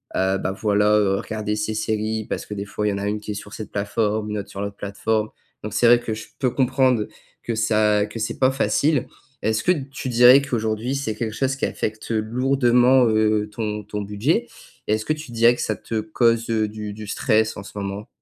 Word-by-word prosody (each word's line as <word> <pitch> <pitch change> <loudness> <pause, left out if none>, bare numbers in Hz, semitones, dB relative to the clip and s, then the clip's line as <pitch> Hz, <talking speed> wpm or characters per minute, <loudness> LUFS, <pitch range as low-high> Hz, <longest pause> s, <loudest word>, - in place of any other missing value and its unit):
heu, 95 +1 +1
bah, 95 - -2
voilà, 105 +1 +2
heu, 95 -2 +2
regarder 105 0 -3
ces 105 +1 -2
séries 110 0 -2
parce - - -3
que 105 - -7
des 100 0 -4
fois, 105 +1 -3
il 105 - +2
y - - -2
en 100 - -3
a 100 - -2
une 105 +1 -1
qui 105 - -6
est - - -2
sur 105 0 -8
cette 110 - -8
plateforme, 105 +1 -1
une 105 - -2
autre 100 - -6
sur 100 - -6
l'autre 100 0 -5
plateforme 105 +2 -1 0.3
donc 105 - -5
c'est - - +2
vrai 120 - +8
que 110 - -3
je 110 - -7
peux 130 - +2
comprendre 130 -3 +2 0.3
que 115 - -3
ça 105 -2 +2
que 115 - -8
c'est 110 +1 -3
pas 130 0 +3
facile. 140 +1 +1 0.3
Est-ce 110 0 0
que - - +4
tu 140 -5 -3
dirais 125 +3 +7
qu'aujourd'hui, 115 -2 -2
c'est 135 -6 -2
quelque 110 -2 -3
chose 135 +3 0
qui 135 - -1
affecte 110 +1 -4
lourdement, 125 +2 +3
heu, 110 -1 +2
ton 105 -1 -4
ton 105 0 -4
budget 115 - 0 0.4
et 105 - +3
est-ce 110 0 -4
que 155 - +1
tu 150 -5 -9
dirais 115 +1 +4
que - - -5
ça 110 - -1
te 110 -1 -3
cause, 115 +1 +1
heu, 110 -2 +1
du 105 0 -6
du 105 +1 -8
stress 110 0 +1
en 100 - -7
ce 100 - -11
moment? 100 +1 -5
110 Hz, 230 wpm, -22 LUFS, 105-120 Hz, 0.4 s, vrai